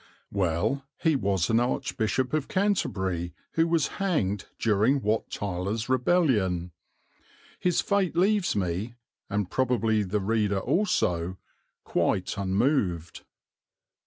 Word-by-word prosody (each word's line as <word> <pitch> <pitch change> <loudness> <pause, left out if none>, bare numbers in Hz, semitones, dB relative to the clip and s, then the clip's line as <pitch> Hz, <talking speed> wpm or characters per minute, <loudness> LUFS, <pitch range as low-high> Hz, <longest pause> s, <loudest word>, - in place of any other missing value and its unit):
Well, 95 +8 0
he 160 -2 +2
was 100 - +1
an 115 - +4
archbishop 120 +1 -1
of 155 -3 0
Canterbury 95 - -1 0.2
who 165 0 +2
was 165 -2 +2 0.2
hanged 105 - 0
during 115 +6 +2
Wat 110 +2 0
Tyler's 100 +4 -3
rebellion. 120 - +2 0.9
His 180 -2 +2
fate 200 -4 0
leaves 195 +2 +2
me, 100 +4 -2 0.3
and 100 -2 -2
probably 115 -4 +1
the 105 +1 -1
reader 105 0 +1
also, 95 - 0 0.5
quite 95 - 0
unmoved. 95 - 0
110 Hz, 105 wpm, -27 LUFS, 95-140 Hz, 0.9 s, an